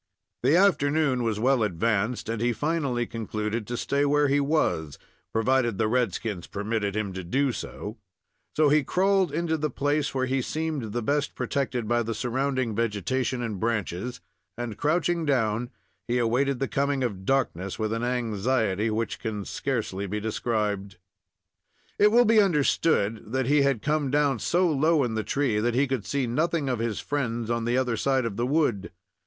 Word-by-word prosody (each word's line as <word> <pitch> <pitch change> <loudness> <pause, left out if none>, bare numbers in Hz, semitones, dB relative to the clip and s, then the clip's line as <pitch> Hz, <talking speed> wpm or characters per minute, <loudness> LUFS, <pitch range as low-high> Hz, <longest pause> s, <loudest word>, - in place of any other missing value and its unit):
The 135 +6 +4
afternoon 155 -8 +3
was 110 -3 -1
well 130 +1 +3
advanced, 105 +4 0
and 115 -1 -2
he 120 0 +2
finally 135 -1 -1
concluded 110 -1 -3
to 120 - -3
stay 140 +4 0
where 145 0 +3
he 140 +1 +3
was, 140 - 0 0.3
provided 120 -1 +1
the 110 - +1
red 120 -2 +1
skins 100 -6 -4
permitted 105 0 -2
him 105 -3 -2
to 95 0 -5
do 135 +10 +1
so; 110 -1 -7 0.6
so 155 -1 +4
he 150 0 +4
crawled 190 +2 +2
into 160 +1 0
the 150 0 -1
place, 145 +2 -1
where 130 -1 +1
he 130 +1 0
seemed 155 -5 -3
the 120 - -2
best 145 +4 0
protected 125 -5 -2
by 120 +1 +2
the 115 -1 -3
surrounding 130 0 -1
vegetation 115 +4 -1
and 110 -5 -4
branches, 110 0 -2 0.4
and, 120 -3 -4
crouching 170 +2 +1
down, 120 -5 0 0.4
he 120 +1 +1
awaited 125 +3 +1
the 135 +1 -1
coming 140 0 0
of 100 -6 -3
darkness 95 -7 -1
with 110 0 -1
an 115 - -2
anxiety 115 -3 0
which 110 +1 -2
can 105 -3 -4
scarcely 110 -7 -3
be 105 +3 -2
described. 105 -3 -2 1.0
It 210 +1 +6
will 240 +2 +6
be 220 -1 +6
understood 145 - +1
that 130 0 0
he 145 +3 +4
had 140 -5 +1
come 150 -2 +1
down 140 -3 +2
so 180 +9 +2
low 155 0 +3
in 120 -3 -1
the 110 0 -1
tree 130 -6 0
that 120 +2 0
he 135 +3 +3
could 130 -6 -3
see 140 -2 0
nothing 150 +4 0
of 125 -3 -1
his 115 -2 -2
friends 120 -5 -2
on 115 -1 -1
the 120 +2 +1
other 125 -3 +1
side 135 -1 +1
of 110 -4 -3
the 120 +4 -1
wood. 130 -9 +1
125 Hz, 180 wpm, -26 LUFS, 110-140 Hz, 1.0 s, It